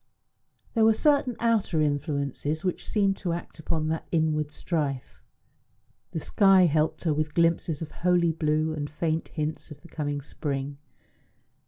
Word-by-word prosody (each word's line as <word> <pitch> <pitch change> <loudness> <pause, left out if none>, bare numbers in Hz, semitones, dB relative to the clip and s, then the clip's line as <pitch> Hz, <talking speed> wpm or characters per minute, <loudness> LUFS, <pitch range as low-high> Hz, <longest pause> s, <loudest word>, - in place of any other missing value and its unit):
There 225 - +3
were 220 0 +6
certain 280 -2 +2
outer 220 -8 +1
influences 145 +1 -1
which 180 - -2
seemed 200 -2 +2
to 175 -3 -2
act 170 -1 -7
upon 155 0 -1
that 160 0 -3
inward 155 -2 +1
strife. 150 -4 -3 0.9
The 160 - -4
sky 195 +3 +5
helped 155 -1 +1
her 160 -4 +2
with 150 0 -2
glimpses 165 -2 +1
of 155 - -8
holy 175 -1 +2
blue 155 0 0
and 145 -1 -4
faint 160 +1 -2
hints 155 +1 -4
of 150 -2 -11
the 170 - -14
coming 145 -3 -3
spring. 140 -1 -4
160 Hz, 150 wpm, -27 LUFS, 150-175 Hz, 0.9 s, were